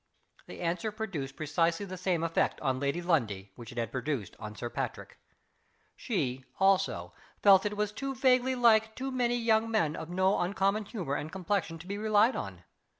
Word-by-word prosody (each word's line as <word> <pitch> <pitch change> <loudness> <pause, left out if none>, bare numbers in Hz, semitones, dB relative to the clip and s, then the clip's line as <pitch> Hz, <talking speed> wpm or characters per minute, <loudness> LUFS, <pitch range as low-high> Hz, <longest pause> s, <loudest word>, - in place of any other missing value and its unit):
The - - -9
answer 180 +6 -1
produced 180 - -5
precisely 165 +5 0
the 185 -1 -6
same 180 -2 0
effect 165 0 +1
on 130 -1 0
Lady 140 +5 -1
Lundie 105 - 0
which 115 -2 -10
it 120 - -12
had 115 -3 -2
produced 130 -5 -3
on 105 -1 -7
Sir 120 - -4
Patrick. - - -5 0.8
She, 130 +1 -2 0.2
also, 195 0 +2 0.3
felt 195 -2 +8
that 210 +1 -2
it - - -8
was 210 0 0
too 270 +5 -4
vaguely 255 0 +3
like 220 -2 +4
too 265 +1 -4
many 245 -2 +1
young 225 -1 +2
men 185 -9 +1
of 160 - -6
no 190 +2 +2
uncommon 195 +3 +1
humor 185 - -4
and 150 +2 -3
complexion 190 -2 -2
to 165 - -12
be 200 +2 -4
relied 215 +2 +4
on. 95 - -6
185 Hz, 185 wpm, -30 LUFS, 145-220 Hz, 0.8 s, felt